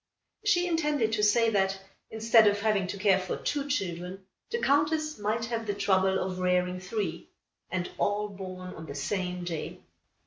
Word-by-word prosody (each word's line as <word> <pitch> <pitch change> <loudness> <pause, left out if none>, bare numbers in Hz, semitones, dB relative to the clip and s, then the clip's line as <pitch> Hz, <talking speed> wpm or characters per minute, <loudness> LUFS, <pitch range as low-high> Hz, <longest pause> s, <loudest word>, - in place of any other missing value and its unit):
She 360 -4 +3
intended 300 -9 +1
to 215 - +1
say 225 +2 +4
that, 195 -2 +1 0.3
instead 225 0 +5
of 205 0 +3
having 205 -3 +1
to 200 - -4
care 190 -1 +4
for 185 -1 -3
two 285 -1 -2
children, 185 -6 -3 0.2
the 470 - -1
Countess 305 - +1
might 215 +3 -1
have 230 -1 -3
the 205 - -1
trouble 190 -1 +2
of 185 -1 -3
rearing 180 0 +1
three, 200 +3 -4 0.4
and 180 -1 -2
all 205 +1 +1
born 185 -2 -7
on 160 0 -9
the 140 - -7
same 180 +4 -2
day. 170 -3 -4
205 Hz, 170 wpm, -29 LUFS, 185-230 Hz, 0.4 s, instead